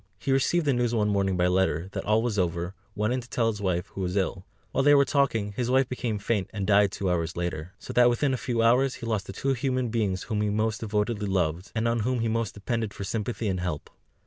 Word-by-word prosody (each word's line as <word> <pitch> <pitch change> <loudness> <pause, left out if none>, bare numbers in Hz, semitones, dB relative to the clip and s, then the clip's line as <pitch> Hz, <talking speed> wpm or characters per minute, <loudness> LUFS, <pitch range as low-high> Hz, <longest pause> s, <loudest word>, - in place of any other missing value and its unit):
He 135 - -2
received 150 +5 +2
the 140 - +3
news 120 -1 +1
one 105 -2 +2
morning 100 -2 +1
by 90 - +3
letter, 90 -2 +1
that - - -4
all 110 +2 +3
was 110 -4 0
over, 85 0 -1 0.2
went 105 +3 0
in 130 - -1
to 120 - -14
tell 115 -2 +1
his 105 -1 -7
wife, 90 -2 0
who 95 - -7
was 90 0 -2
ill; 95 -1 -1 0.2
while 135 - +1
they 145 +1 +6
were 140 -1 +5
talking, 120 -8 +1
his 120 +4 -2
wife 130 0 +3
became 120 -4 -2
faint, 100 -1 -1
and 100 -3 -3
died 100 -1 +4
two 100 - -3
hours 85 -2 -1
later. 85 0 -4
So - - -8
that 125 0 +6
within 130 +3 +1
a - - 0
few 120 -2 -1
hours 125 +3 +3
he - - -8
lost 110 -4 -1
the - - -5
two 135 +7 0
human 130 -1 -1
beings 105 -5 -1
whom 105 -2 -2
he 105 - +1
most 110 +2 0
devotedly 105 -1 -1
loved, 90 -1 -1
and 110 +1 +1
on 115 0 +1
whom 120 +2 0
he 115 - 0
most 115 -2 -1
depended 110 0 -3
for - - -5
sympathy 110 +3 -2
and 95 -2 -1
help. 90 -5 -4
105 Hz, 255 wpm, -27 LUFS, 95-120 Hz, 0.2 s, they